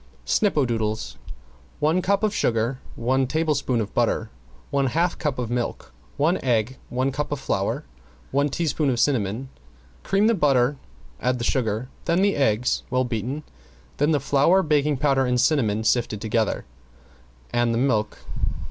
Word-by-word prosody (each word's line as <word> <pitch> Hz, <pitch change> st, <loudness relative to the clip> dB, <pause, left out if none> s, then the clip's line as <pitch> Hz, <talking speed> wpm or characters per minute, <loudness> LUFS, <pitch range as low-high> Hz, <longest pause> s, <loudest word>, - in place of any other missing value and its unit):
~SNIPPODOODLES~ 120 Hz, -, 0 dB, 0.6 s
One 155 Hz, +5 st, +2 dB
cup 200 Hz, +3 st, +1 dB
of 215 Hz, -1 st, +2 dB
sugar, 115 Hz, -, 0 dB, 0.2 s
one 130 Hz, +2 st, +1 dB
tablespoon 145 Hz, -5 st, 0 dB
of 105 Hz, -2 st, -3 dB
butter, 115 Hz, -2 st, 0 dB, 0.4 s
one 140 Hz, -1 st, +2 dB
half 165 Hz, +7 st, +1 dB
cup 150 Hz, -4 st, -1 dB
of 120 Hz, -2 st, -3 dB
milk, 120 Hz, -1 st, -3 dB, 0.2 s
one 160 Hz, +6 st, +2 dB
egg, 120 Hz, 0 st, +1 dB
one 130 Hz, +2 st, 0 dB
cup 145 Hz, +3 st, -3 dB
of 145 Hz, -, -2 dB
flour, 95 Hz, -, -1 dB, 0.5 s
one 140 Hz, +2 st, +2 dB
teaspoon 150 Hz, -1 st, 0 dB
of 120 Hz, -2 st, 0 dB
cinnamon. 120 Hz, -1 st, 0 dB, 0.5 s
Cream 195 Hz, +2 st, +2 dB
the 230 Hz, -, +4 dB
butter, 140 Hz, -, +2 dB, 0.4 s
add 125 Hz, 0 st, +1 dB
the 120 Hz, -, -4 dB
sugar, 115 Hz, -1 st, 0 dB, 0.2 s
then 170 Hz, +3 st, +2 dB
the 200 Hz, 0 st, +3 dB
eggs 125 Hz, -3 st, +1 dB
well 130 Hz, 0 st, +2 dB
beaten, 125 Hz, +5 st, -3 dB, 0.5 s
then 145 Hz, +2 st, +2 dB
the 150 Hz, -2 st, +3 dB
flour, 145 Hz, +8 st, +3 dB
baking 150 Hz, -2 st, +2 dB
powder 135 Hz, -2 st, +2 dB
and 125 Hz, 0 st, +1 dB
cinnamon, 110 Hz, -8 st, +2 dB
sifted 110 Hz, -2 st, +1 dB
together, 110 Hz, 0 st, -1 dB, 0.9 s
and 120 Hz, -1 st, +2 dB
the 115 Hz, -, 0 dB
milk. 110 Hz, -5 st, +1 dB
130 Hz, 150 wpm, -24 LUFS, 115-150 Hz, 0.9 s, the